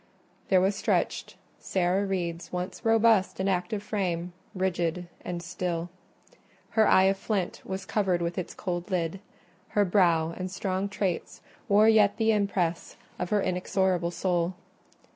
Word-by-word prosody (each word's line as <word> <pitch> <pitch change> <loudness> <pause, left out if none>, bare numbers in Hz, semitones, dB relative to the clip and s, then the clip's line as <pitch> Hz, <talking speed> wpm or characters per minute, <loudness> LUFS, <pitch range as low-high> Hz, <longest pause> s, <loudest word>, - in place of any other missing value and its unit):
There 185 -2 +5
was 195 +2 +2
stretched - - -1 0.2
Sarah 190 +2 0
Reed's 175 -3 -3
once 180 +4 -4
robust 225 -4 +3
and 190 - 0
active 190 +2 -1
frame, 180 -4 -2 0.2
rigid 180 -2 -1 0.2
and 175 -1 -4
still: 175 -1 -3 0.8
her 220 -1 +4
eye 190 - +6
of 195 0 +3
flint 195 -5 -2
was 190 0 -5
covered 190 -4 +1
with 170 0 -2
its 180 - -5
cold 180 -1 -4
lid; 180 0 -1 0.6
her 205 - +5
brow 170 -4 +3
and 185 0 -4
strong 190 +1 -2
traits 190 -3 -3 0.3
wore 210 +2 +6
yet 215 -2 +5
the 225 -1 +3
impress 195 -5 -1 0.2
of 180 - -2
her 210 -1 +2
inexorable 180 -1 0
soul. 175 0 -1
185 Hz, 145 wpm, -28 LUFS, 175-200 Hz, 0.8 s, eye